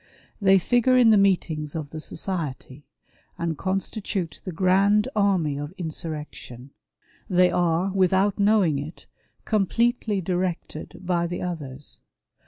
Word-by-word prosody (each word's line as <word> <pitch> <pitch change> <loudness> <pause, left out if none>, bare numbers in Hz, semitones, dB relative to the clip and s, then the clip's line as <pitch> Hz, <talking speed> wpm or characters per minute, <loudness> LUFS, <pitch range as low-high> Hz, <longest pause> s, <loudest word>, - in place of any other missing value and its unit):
They 195 -1 +6
figure 245 +6 +3
in 235 -3 +6
the - - +6
meetings 165 -6 +1
of 155 -3 -5
the 155 - -6
society, 150 -5 -5 0.5
and 165 -1 -2
constitute 190 -1 -3
the 185 - -5
grand 195 +5 +3
army 185 -9 +1
of 145 +3 -6
insurrection; 150 -6 -7 0.6
they 180 -1 +4
are, 175 +2 +1
without 190 +2 +2
knowing 200 -8 +3
it, 150 +4 -8 0.4
completely 220 0 +1
directed 180 -3 -4
by 175 -1 +1
the 175 +1 -4
others. 145 -6 -5
180 Hz, 120 wpm, -24 LUFS, 155-195 Hz, 0.6 s, They